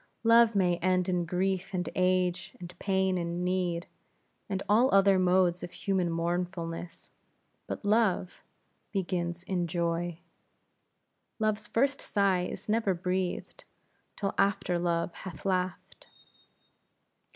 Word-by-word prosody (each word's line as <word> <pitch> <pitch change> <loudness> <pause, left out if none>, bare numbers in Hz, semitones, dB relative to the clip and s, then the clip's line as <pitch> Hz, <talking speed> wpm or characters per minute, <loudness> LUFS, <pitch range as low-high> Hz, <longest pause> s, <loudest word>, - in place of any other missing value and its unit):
Love 230 -1 +6
may 180 -3 +3
end 180 +1 +1
in 180 -2 0
grief 185 +2 -1
and 180 0 -1
age, 185 0 +1
and 175 0 -9
pain 190 -2 +1
and 170 +1 -2
need, 180 -2 0 0.6
and 195 -1 -2
all 235 +6 +4
other 195 -1 +5
modes 180 -1 +3
of - - -5
human 185 -1 -1
mournfulness; 170 0 -3 0.6
but - - -5
love 205 -4 +1 0.5
begins 175 -3 -2
in 180 -2 -1
joy. 170 0 -1 1.2
Love's 215 -1 0
first 275 +4 +1
sigh 195 -3 +1
is 180 - -6
never 215 -3 +1
breathed, 180 +1 -3 0.5
till 195 -1 -2
after 195 -3 +1
love 170 -1 0
hath 170 -4 -9
laughed. 185 -1 -2
185 Hz, 120 wpm, -29 LUFS, 175-195 Hz, 1.2 s, Love